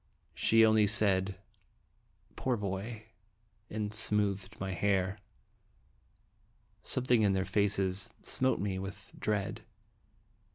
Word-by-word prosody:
She 115 Hz, 0 st, +5 dB
only 110 Hz, -1 st, +4 dB
said, 95 Hz, -2 st, +2 dB, 1.0 s
"Poor 125 Hz, -2 st, 0 dB
boy!" 105 Hz, +3 st, -5 dB, 0.6 s
and 105 Hz, -1 st, -3 dB
smoothed 105 Hz, -1 st, 0 dB
my 95 Hz, -1 st, -3 dB
hair. 95 Hz, +1 st, 0 dB, 1.6 s
Something 125 Hz, -2 st, +1 dB
in 100 Hz, -2 st, +3 dB
their 95 Hz, 0 st, 0 dB
faces 100 Hz, -2 st, +1 dB
smote 130 Hz, 0 st, +1 dB
me 95 Hz, -1 st, -2 dB
with 95 Hz, 0 st, -8 dB
dread. 105 Hz, -1 st, -1 dB
100 Hz, 95 wpm, -32 LUFS, 95-110 Hz, 1.6 s, She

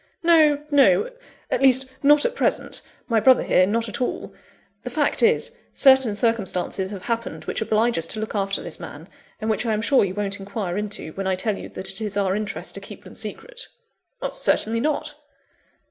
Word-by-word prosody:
"No, 310 Hz, -4 st, +5 dB
no 290 Hz, -, +4 dB, 0.4 s
at 250 Hz, -, +1 dB
least, 265 Hz, -1 st, +5 dB, 0.2 s
not 295 Hz, +1 st, +5 dB
at -, -, +1 dB
present; 475 Hz, -, 0 dB, 0.3 s
my 230 Hz, -3 st, +2 dB
brother 255 Hz, +3 st, +5 dB
here, 185 Hz, -, +3 dB
not 230 Hz, +3 st, 0 dB
at 210 Hz, -, -4 dB
all. 250 Hz, -, -3 dB, 0.5 s
The -, -, -6 dB
fact -, -, +1 dB
is, 475 Hz, +1 st, +3 dB, 0.2 s
certain 265 Hz, -6 st, +5 dB
circumstances 195 Hz, -4 st, -1 dB
have 195 Hz, -2 st, -7 dB
happened 230 Hz, -1 st, -3 dB
which -, -, -3 dB
oblige 220 Hz, -1 st, +1 dB
us 165 Hz, -, -3 dB
to 215 Hz, -, -2 dB
look 220 Hz, -, -4 dB
after 195 Hz, -2 st, -1 dB
this 170 Hz, -, -8 dB
man; 155 Hz, +4 st, -9 dB, 0.3 s
and 215 Hz, -, -4 dB
which 220 Hz, +1 st, +1 dB
I 225 Hz, -2 st, 0 dB
am 215 Hz, -, -1 dB
sure 270 Hz, +3 st, +4 dB
you 190 Hz, -1 st, -2 dB
won't 200 Hz, -1 st, -2 dB
inquire 195 Hz, -2 st, -4 dB
into, 205 Hz, -5 st, -4 dB
when 195 Hz, 0 st, -4 dB
I 190 Hz, -, +1 dB
tell 205 Hz, +3 st, -1 dB
you -, -, -8 dB
that 190 Hz, -, -5 dB
it -, -, -11 dB
is 210 Hz, -2 st, -2 dB
our 195 Hz, -1 st, +1 dB
interest 210 Hz, 0 st, -4 dB
to -, -, -6 dB
keep -, -, -11 dB
them -, -, -12 dB
secret." -, -, -6 dB, 0.6 s
"Certainly 225 Hz, +1 st, +1 dB
not!" 300 Hz, +2 st, -1 dB
220 Hz, 195 wpm, -23 LUFS, 200-265 Hz, 0.6 s, No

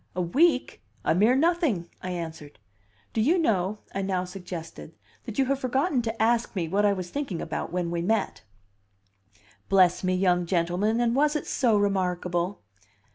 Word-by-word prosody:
"A 180 Hz, -, 0 dB
week? 270 Hz, -, +2 dB, 0.2 s
A -, -, +3 dB
mere 215 Hz, +8 st, +4 dB
nothing!" 305 Hz, -, +1 dB
I 185 Hz, -, -5 dB
answered 160 Hz, -4 st, -6 dB, 0.6 s
"Do 220 Hz, -, +1 dB
you 315 Hz, +11 st, +3 dB
know," 210 Hz, -, 0 dB
I 195 Hz, -, -2 dB
now 190 Hz, -2 st, -1 dB
suggested, 180 Hz, -2 st, -8 dB, 0.3 s
"that -, -, -7 dB
you 270 Hz, -, +3 dB
have 275 Hz, +1 st, 0 dB
forgotten 265 Hz, +2 st, +1 dB
to 225 Hz, -1 st, -4 dB
ask 230 Hz, +1 st, +1 dB
me 175 Hz, -4 st, -1 dB
what 200 Hz, +5 st, +1 dB
I -, -, +3 dB
was 185 Hz, -2 st, -5 dB
thinking 275 Hz, -, -3 dB
about 160 Hz, +1 st, -4 dB
when 175 Hz, -1 st, -2 dB
we 170 Hz, 0 st, -1 dB
met?" 210 Hz, +4 st, -1 dB, 1.3 s
"Bless 185 Hz, -2 st, +4 dB
me, 185 Hz, 0 st, +1 dB
young 180 Hz, -2 st, +2 dB
gentleman! 180 Hz, +6 st, +1 dB
and 240 Hz, 0 st, +1 dB
was 300 Hz, +2 st, +2 dB
it 300 Hz, -, -2 dB
so 230 Hz, -5 st, +2 dB
remarkable?" 180 Hz, -, -1 dB
195 Hz, 170 wpm, -26 LUFS, 180-240 Hz, 1.3 s, mere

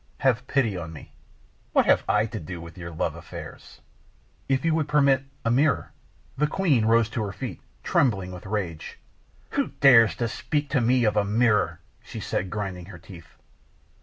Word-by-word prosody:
"Have 130 Hz, -1 st, +1 dB
pity 120 Hz, -7 st, +1 dB
on 85 Hz, -2 st, -6 dB
me." 75 Hz, -, -12 dB, 0.6 s
"What -, -, +4 dB
have -, -, +4 dB
I 105 Hz, +1 st, +3 dB
to 110 Hz, -1 st, -6 dB
do 85 Hz, +2 st, -7 dB
with 85 Hz, 0 st, -10 dB
your 85 Hz, -2 st, -7 dB
love 80 Hz, -, -2 dB
affairs?" -, -, -11 dB, 0.7 s
"If 135 Hz, +1 st, +1 dB
you 165 Hz, -, +3 dB
would 155 Hz, -2 st, 0 dB
permit 140 Hz, -3 st, +3 dB, 0.2 s
a 115 Hz, -, +2 dB
mirror 140 Hz, +1 st, +2 dB, 0.2 s
" -, -, -33 dB
The 150 Hz, -, +3 dB
queen 150 Hz, -, +2 dB
rose 115 Hz, 0 st, +4 dB
to 115 Hz, -, -3 dB
her 100 Hz, -, -4 dB
feet, -, -, -7 dB, 0.2 s
trembling 95 Hz, -9 st, +1 dB
with 90 Hz, +1 st, -9 dB
rage. 95 Hz, -6 st, -4 dB, 0.5 s
"Who -, -, -1 dB
dares 115 Hz, -5 st, +7 dB
to 120 Hz, -, -1 dB
speak 145 Hz, +4 st, -2 dB
to 135 Hz, -3 st, +2 dB
me 125 Hz, +1 st, +3 dB
of 105 Hz, -2 st, +2 dB
a 105 Hz, -, +4 dB
mirror?" 105 Hz, +1 st, +1 dB, 0.2 s
she -, -, -9 dB
said, 95 Hz, -, -2 dB
grinding 95 Hz, -3 st, -4 dB
her 95 Hz, -4 st, -10 dB
teeth. 85 Hz, -1 st, -14 dB
115 Hz, 185 wpm, -25 LUFS, 95-135 Hz, 0.7 s, dares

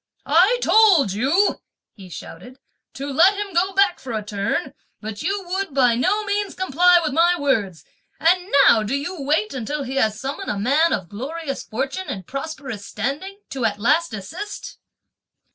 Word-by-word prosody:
"I 365 Hz, -, +4 dB
told 380 Hz, -, +5 dB
you," 285 Hz, -, +1 dB, 0.3 s
he 190 Hz, -3 st, -13 dB
shouted, 185 Hz, +9 st, -10 dB, 0.4 s
"to 275 Hz, -, -5 dB
let 365 Hz, +8 st, +5 dB
him 405 Hz, -1 st, -5 dB
go 360 Hz, +3 st, +2 dB
back 390 Hz, -2 st, +2 dB
for 255 Hz, -3 st, -7 dB
a 215 Hz, -1 st, -2 dB
turn; 210 Hz, -, -2 dB, 0.3 s
but 215 Hz, -1 st, -7 dB
you 390 Hz, +4 st, -2 dB
would 380 Hz, -5 st, -3 dB
by 250 Hz, -3 st, +4 dB
no 410 Hz, -, +1 dB
means 410 Hz, -1 st, -2 dB
comply 360 Hz, 0 st, +4 dB
with 300 Hz, -, -2 dB
my 340 Hz, +3 st, +4 dB
words! 215 Hz, -, -1 dB, 0.3 s
and 360 Hz, +4 st, +2 dB, 0.2 s
now 220 Hz, -, +6 dB
do 215 Hz, +5 st, -2 dB
you 285 Hz, +4 st, -4 dB
wait 305 Hz, +9 st, 0 dB
until 275 Hz, +4 st, -4 dB
he 265 Hz, +1 st, -5 dB
has 220 Hz, -4 st, +1 dB
summoned 280 Hz, +9 st, -5 dB
a 205 Hz, -, -2 dB
man 285 Hz, +11 st, +2 dB
of 185 Hz, -, -2 dB
glorious 275 Hz, -, -5 dB
fortune 270 Hz, +11 st, -4 dB
and 190 Hz, -3 st, -5 dB
prosperous 275 Hz, -, -6 dB
standing 290 Hz, -, -5 dB
to 265 Hz, -3 st, -4 dB
at 210 Hz, -2 st, 0 dB
last 310 Hz, +11 st, +2 dB
desist?" 325 Hz, -, -8 dB
280 Hz, 170 wpm, -21 LUFS, 230-365 Hz, 0.4 s, now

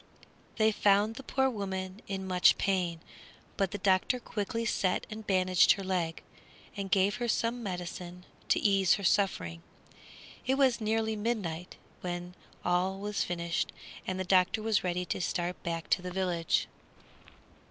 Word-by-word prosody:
They 220 Hz, 0 st, +4 dB
found 205 Hz, +1 st, +3 dB
the 250 Hz, -, -8 dB
poor 265 Hz, 0 st, +1 dB
woman 190 Hz, -4 st, -4 dB
in 190 Hz, -1 st, -3 dB
much 180 Hz, -1 st, +5 dB
pain, 180 Hz, -4 st, 0 dB, 0.5 s
but 195 Hz, -2 st, +1 dB
the 205 Hz, -, -4 dB
doctor 190 Hz, +6 st, +2 dB
quickly 230 Hz, +1 st, -3 dB
set 185 Hz, -4 st, 0 dB
and 215 Hz, 0 st, -7 dB
bandaged 185 Hz, -2 st, +5 dB
her 195 Hz, -, -6 dB
leg, 175 Hz, -4 st, -2 dB, 0.5 s
and 200 Hz, -2 st, -4 dB
gave 200 Hz, +3 st, +3 dB
her 240 Hz, 0 st, -2 dB
some 235 Hz, +2 st, 0 dB
medicine 180 Hz, -2 st, -6 dB, 0.2 s
to -, -, +4 dB
ease 195 Hz, -3 st, +4 dB
her 200 Hz, -, -6 dB
suffering. 170 Hz, -, +1 dB, 0.9 s
It 265 Hz, -, +3 dB
was 260 Hz, -4 st, +3 dB
nearly 220 Hz, 0 st, 0 dB
midnight 205 Hz, -6 st, -3 dB, 0.2 s
when 175 Hz, 0 st, -5 dB, 0.3 s
all 180 Hz, +2 st, +1 dB
was 205 Hz, +1 st, -1 dB
finished 170 Hz, -1 st, -2 dB, 0.4 s
and 185 Hz, 0 st, -2 dB
the -, -, 0 dB
doctor 185 Hz, +3 st, +3 dB
was 220 Hz, -1 st, +2 dB
ready 180 Hz, 0 st, -1 dB
to -, -, -3 dB
start 175 Hz, +1 st, -2 dB
back 165 Hz, -1 st, -3 dB
to -, -, +3 dB
the 180 Hz, -, -5 dB
village. 180 Hz, -3 st, 0 dB
190 Hz, 150 wpm, -30 LUFS, 180-215 Hz, 0.9 s, much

